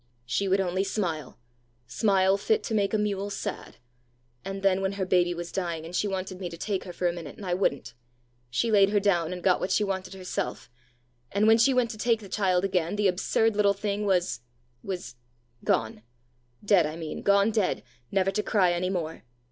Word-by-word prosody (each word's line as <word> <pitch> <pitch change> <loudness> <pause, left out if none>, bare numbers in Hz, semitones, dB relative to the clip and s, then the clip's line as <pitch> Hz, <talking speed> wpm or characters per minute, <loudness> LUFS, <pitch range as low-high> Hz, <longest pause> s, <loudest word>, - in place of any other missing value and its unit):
She 130 +11 -1
would 195 +1 +3
only 185 0 0
smile 165 -9 -3 0.5
smile 190 - +2
fit 440 - +1
to 225 - -4
make 200 -2 +1
a 215 - +2
mule 205 -1 -1
sad! 200 - -5 0.7
And 195 0 -5
then 195 -1 +3
when 190 0 -1
her 195 -1 -2
baby 175 -1 +2
was 170 0 -6
dying, 170 -4 -3
and 170 +2 -7
she 210 - +1
wanted 190 -1 -4
me 180 -2 -4
to 170 - -9
take 195 +2 -3
her 180 - -6
for 175 +1 -1
a 170 - 0
minute, 165 -5 -8
and 205 - -8
I 180 - -1
wouldn't! 175 -6 -1 0.6
She 175 - 0
laid 200 -2 +5
her 205 0 +3
down, 175 -5 +1
and 180 -1 -6
got 185 -2 +3
what 185 - -2
she 210 - +2
wanted 190 -1 -3
herself, 185 -8 -4 0.6
and 200 +2 +2
when 225 +1 +6
she 230 +4 +5
went 250 -3 +2
to 215 - -9
take 230 -1 +2
the 200 -3 -11
child 185 -2 +1
again, 180 -1 0
the 205 -1 +2
absurd 205 +4 +1
little 200 -1 +3
thing 205 +1 -2
was 180 -8 +1 0.4
was 185 -10 -6 0.5
gone 110 -1 0 0.6
dead, 190 -6 +4
I 155 - -6
mean 160 -2 -6
gone 200 +2 +4
dead, 215 -4 0 0.3
never 195 0 +1
to 210 - 0
cry 195 -5 +2
any 180 +1 -1
more! 165 -4 -3
190 Hz, 205 wpm, -27 LUFS, 175-205 Hz, 0.7 s, when